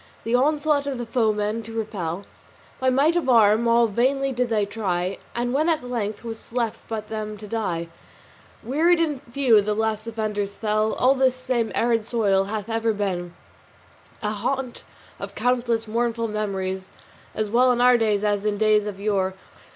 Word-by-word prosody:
The 230 - -2
onslaught 290 +2 +2
of 275 -2 -2
the 240 - -4
foeman 220 -2 0
to 225 +1 -8
repel 195 -5 -3 0.6
By 260 - +2
might 280 +6 +3
of 335 -7 0
arm 225 -1 +5
all 235 0 +5
vainly 265 +5 +1
did 250 -1 -1
they 215 -3 +1
try, 190 -3 -2 0.2
And 245 +1 -1
when 310 +5 +2
at 315 -5 +1
length 215 -4 -3
'twas 225 -1 -8
left 230 -2 -3
them 215 -1 -4
but 210 - -11
to 210 - -8
die, 190 -7 -2 0.8
Wearied 325 +8 +3
and 300 -5 0
few 245 -5 +4
the 210 +1 -1
last 220 0 -1
defenders 210 -3 -3
fell. 215 0 0
And 265 +1 +3
this 260 -1 +4
same 255 -3 -1
arid 230 -1 +2
soil 205 -4 +1
hath 210 0 -4
ever 225 0 0
been 180 -4 -3 0.9
A 210 - 0
haunt 250 +4 -3 0.4
of - - -7
countless 235 -2 0
mournful 230 +1 -1
memories, 190 -3 -3 0.5
As 215 -1 -2
well 250 +2 +5
in 245 - 0
our 250 0 +6
day 220 -3 +2
as 205 -1 0
in 210 -1 0
days 215 0 +3
of 200 -2 -6
yore. 195 -2 0
225 Hz, 175 wpm, -24 LUFS, 210-245 Hz, 0.9 s, our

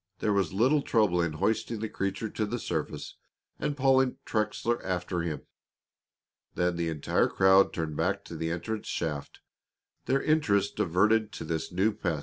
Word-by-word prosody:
There 105 - 0
was 100 -1 +1
little 130 +10 +3
trouble 105 -9 +2
in 85 -2 -1
hoisting 110 +6 -1
the 110 - -2
creature 100 +1 -3
to 110 0 -2
the 120 - -2
surface - - -4 0.4
and 145 - -2
pulling 130 -1 +3
Trexler 110 +2 -1
after 90 -1 -2
him. 85 -3 -4 1.1
Then 90 0 +1
the 85 -1 -1
entire 75 -3 +1
crowd 95 +1 +5
turned 80 -2 -3
back 95 +6 -1
to 85 - -8
the 80 +1 -2
entrance 90 +6 -4
shaft, 75 -4 -4 0.6
their 135 +1 +1
interest 110 -11 +2
diverted 105 +5 +2
to - - -6
this 80 0 -3
new 95 +5 +2
pet. 90 -7 -2
100 Hz, 160 wpm, -29 LUFS, 85-110 Hz, 1.1 s, crowd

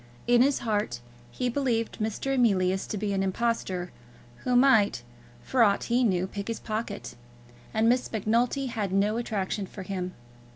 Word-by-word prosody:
In 240 0 +5
his 275 +2 +4
heart 205 - -1 0.3
he 185 - -2
believed 240 -3 -1
Mr. 220 +5 -1
Emilius 190 -7 +2
to 210 - -3
be 205 0 -1
an 195 - 0
impostor, 190 -3 -1 0.5
who 250 - -1
might, 225 - +4 0.4
for 260 - +1
aught 205 -3 +4
he 245 +2 +2
knew, 185 -5 +2
pick 200 +1 -6
his 230 -1 -3
pocket; 215 -1 -4 0.6
and 220 +1 +2
Miss 250 +2 +2
Macnulty 235 +5 +1
had 215 -6 -2
no 205 +3 +2
attraction 205 -4 -2
for 190 - -8
him. 185 -1 -4
215 Hz, 160 wpm, -27 LUFS, 195-240 Hz, 0.6 s, In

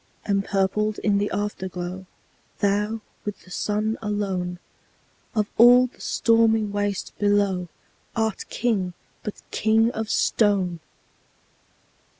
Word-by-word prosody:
Empurpled 200 +1 +1
in 200 -1 +3
the 205 - 0
Afterglow, 190 -2 -4 0.5
Thou, 210 +2 0 0.2
with 210 -1 -6
the 180 - -17
Sun 215 +4 -1
alone, 195 -4 -2 0.8
Of 215 -1 +2
all 245 +2 +8
the 250 - -11
stormy 225 -1 +3
waste 205 -1 -2
below, 200 -3 +2 0.5
Art 220 -2 -1
King, 205 -6 0 0.3
but 210 - -7
king 225 +1 +3
of 220 -2 -4
stone! 195 -6 +2
205 Hz, 105 wpm, -24 LUFS, 195-220 Hz, 0.8 s, all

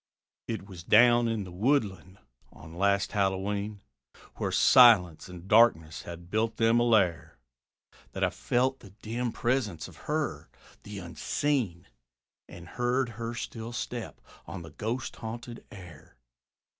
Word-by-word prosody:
It 110 -4 -4
was 90 -4 -10
down 120 +4 +5
in 115 -3 -1
the 90 - -10
woodland 100 - -1 0.3
on 80 +5 -13
last 100 +2 +1
Hallowe'en, 100 +1 -1 0.6
Where 95 - -2
silence 95 - +5
and 90 0 -11
darkness 100 -8 +4
had 85 +1 -10
built 110 +1 0
them 115 +1 +3
a - - +3
lair, 95 - +1 0.8
That - - -3
I - - +2
felt 130 +2 0
the 100 - -14
dim 120 +2 -2
presence 115 -10 -1
of - - -15
her, - - -2 0.3
the 105 0 -9
unseen, 95 - -2 0.6
And 85 0 -11
heard 125 +1 -1
her 115 +1 -6
still 115 -1 -6
step 120 -1 -5 0.3
on 85 - -7
the 80 - -11
ghost 115 - -4
haunted 115 +1 -7
air. 90 -6 -13
105 Hz, 135 wpm, -28 LUFS, 90-120 Hz, 0.8 s, down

